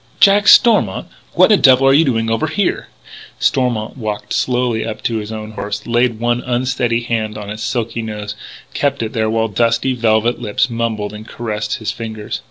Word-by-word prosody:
Jack 200 +1 +5
Stormont! 210 - +5 0.2
What - - +5
the - - +6
devil 130 0 +5
are 135 - +6
you 150 +4 +5
doing 115 -5 0
over 135 +8 0
here?" 175 +5 -1 0.5
Stormont 125 -3 0
walked 110 -4 -4
slowly 125 -3 0
up 110 -1 -6
to 115 - -1
his 105 0 -5
own 110 0 -6
horse, 105 0 -5
laid 120 -1 +1
one 120 +1 0
unsteady 125 -1 -1
hand 110 -2 -2
on 105 -1 -7
its 110 +1 -7
silky 115 -1 -2
nose, 105 -2 -5 0.4
kept 140 -3 -1
it 110 - -5
there 110 -1 0
while 115 0 +1
dusty, 115 +4 +1
velvet 115 0 +1
lips 120 +3 0
mumbled 110 -3 -2
and 105 +1 -10
caressed 105 -2 -4
his 110 -2 -3
fingers. 110 -1 -6
115 Hz, 180 wpm, -17 LUFS, 110-125 Hz, 0.5 s, the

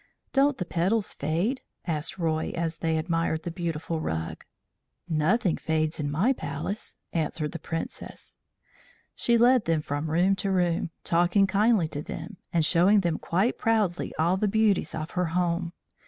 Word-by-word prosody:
"Don't 280 0 +3
the 180 - -3
petals 190 +6 0
fade?" 170 - -1 0.2
asked 165 +1 -2
Roy 160 -3 0
as 165 -1 -2
they 160 -1 0
admired 165 0 0
the 170 - -4
beautiful 165 -2 -3
rug. 80 - -3 0.6
"Nothing 170 +5 +2
fades 155 0 -1
in 145 -1 -1
my 185 - +2
Palace," 155 - -5 0.2
answered 155 -2 -1
the - - -6
Princess. 165 0 -6 0.8
She 235 -1 +2
led 245 0 +5
them 165 -2 +1
from 145 +2 -3
room 180 +5 +3
to 195 - -1
room, 175 -3 +1
talking 175 +4 +3
kindly 200 -2 +3
to 145 - -4
them, 165 +5 -7
and 165 -2 +2
showing 185 +5 +4
them 170 -3 -1
quite 195 +8 0
proudly 215 -6 +1
all 170 +4 +2
the 210 - +1
beauties 205 -5 +2
of 155 0 -4
her 180 0 0
home. 170 -1 0
170 Hz, 155 wpm, -27 LUFS, 160-195 Hz, 0.8 s, led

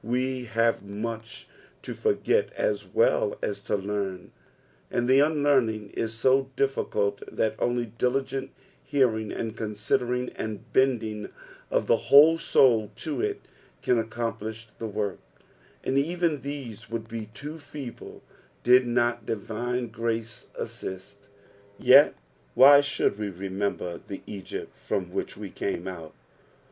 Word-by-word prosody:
We 125 +2 -1
have 115 0 +1
much 110 +3 -6 0.4
to - - -5
forget 450 +2 +1
as - - -1
well - - +2
as 435 -5 -2
to - - -1
learn, 100 -2 -3 0.6
and 120 0 0
the 130 +1 +6
unlearning 140 -8 +2
is 115 0 -3
so 130 +3 +3
difiicult 100 -7 0
that 110 - 0
only 120 0 +1
diligent 130 +3 -1 0.3
hearing, 120 -6 +1
and 115 -1 -4
considering, 120 +4 -1
and 110 -2 -7
bending 110 -5 +1 0.4
of - - +1
the - - +4
whole 155 +4 +8
soul 115 -9 +4
to 155 +6 -3
it, 415 -1 -1 0.4
can 125 - +3
accomplish 110 -1 -4
the 115 - -3
work; 105 -2 -3 0.6
and 135 +1 +2
even 165 -1 0
these 130 -6 -7
would 115 -1 -4
be 110 -1 -6
too 150 +3 -7
feeble 140 -5 -9 0.4
did 125 +1 +6
not 120 -1 +1
divine 120 +3 -2
grace 115 0 -3
assist. 100 +2 -7 0.5
Yet - - +7 0.4
why 140 +3 +9
should 140 -7 0
we 105 -1 -2
remember 95 -1 -3
the 100 - -7
Egypt 100 -3 -7
from - - -3
which - - -3
we - - -7
came 85 - -3
out 85 -6 -8
115 Hz, 130 wpm, -27 LUFS, 105-135 Hz, 0.6 s, why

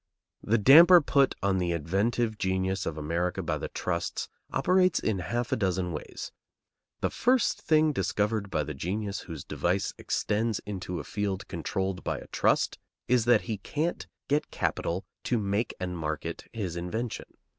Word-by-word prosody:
The 115 +3 +2
damper 165 - +9
put 140 -3 +2
on 95 -1 +2
the 85 -1 0
inventive 105 +7 0
genius 95 0 0
of 80 - -3
America 85 +3 -1
by - - -1
the - - -3
trusts 85 -2 -3 0.2
operates 185 -1 +3
in 105 -4 -1
half 120 +7 -2
a - - +3
dozen 95 -5 0
ways: 75 - -6 0.7
The - - 0
first 250 0 +2
thing 155 -1 +3
discovered 105 -4 0
by 75 -5 0
the 75 - -5
genius 100 +8 -3
whose 80 -5 -7
device 95 +3 -1
extends 110 +1 0
into 90 -3 -4
a - - -5
field 100 +4 -3
controlled 95 +1 -3
by - - -1
a - - -9
trust - - +1 0.3
is 120 -2 +3
that 120 -3 +5
he 110 -4 -4
can't 155 - -2 0.2
get 150 +2 +1
capital 90 +3 -2 0.2
to 125 - +1
make 105 +2 -1
and 90 -1 -3
market 80 +1 -4
his 100 -7 -4
invention. 110 +7 -4
100 Hz, 160 wpm, -28 LUFS, 90-120 Hz, 0.7 s, damper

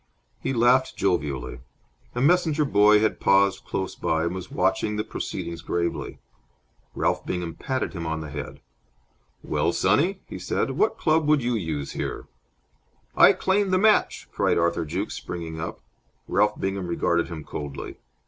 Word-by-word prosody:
He - - -2
laughed 130 +1 +3
jovially. 70 -10 -1 0.6
A 120 - -1
messenger 155 0 +3
boy 105 -4 +5
had 110 - +1
paused 100 0 +3
close 95 -1 -3
by 80 0 -1
and 85 +1 -1
was 95 -1 -6
watching 95 +3 0
the 105 - -1
proceedings 85 -5 -5
gravely. 85 0 -2 0.8
Ralph - - 0
Bingham 90 -2 -3
patted 130 -1 -3
him 85 -3 -4
on 80 0 -2
the 75 -2 -7
head. 75 -2 -7 0.8
"Well, - - 0
sonny," 160 - +2
he - - -8
said, - - -1
"what 425 +1 +1
club 155 -1 +2
would 150 -4 +3
you 120 +1 0
use 80 -10 -3
here?" - - -4 0.9
"I - - +8
claim 195 +1 +1
the 185 - +3
match!" 215 +2 +3
cried - - +1
Arthur 85 -1 +1
Jukes, 90 +7 -3
springing 85 -2 -6
up. - - -6 0.5
Ralph 105 0 +2
Bingham 95 -1 -2
regarded 85 0 +1
him 85 -3 -7
coldly. 70 -1 -7
95 Hz, 155 wpm, -25 LUFS, 85-130 Hz, 0.9 s, I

